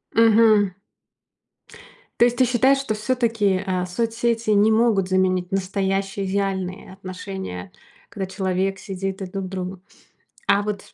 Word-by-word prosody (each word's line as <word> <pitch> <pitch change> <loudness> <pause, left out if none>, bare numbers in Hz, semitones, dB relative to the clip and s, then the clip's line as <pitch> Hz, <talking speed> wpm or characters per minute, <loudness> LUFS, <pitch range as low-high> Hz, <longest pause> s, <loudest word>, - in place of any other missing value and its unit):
Мгм. 220 -3 +5 1.5
То 235 - +7
есть, 245 0 0
ты 255 - +5
считаешь 255 +3 +3
что 260 -5 -2
всё-таки, 215 -4 0
э, 185 -1 -1
соцсети 230 +3 -1
не 210 +1 +4
могут 220 -4 +2
заменить 185 0 +1
настоящие 195 +1 -1
идеальные 190 -1 -2
отношения, 185 - -7 0.4
когда 195 -2 -4
человек 190 0 -1
сидит 195 0 -5
и - - -2
друг 190 +1 -5
к - - -5
другу. 185 -1 -5 0.7
А 200 - +4
вот 205 -1 -5
195 Hz, 130 wpm, -22 LUFS, 185-220 Hz, 1.5 s, То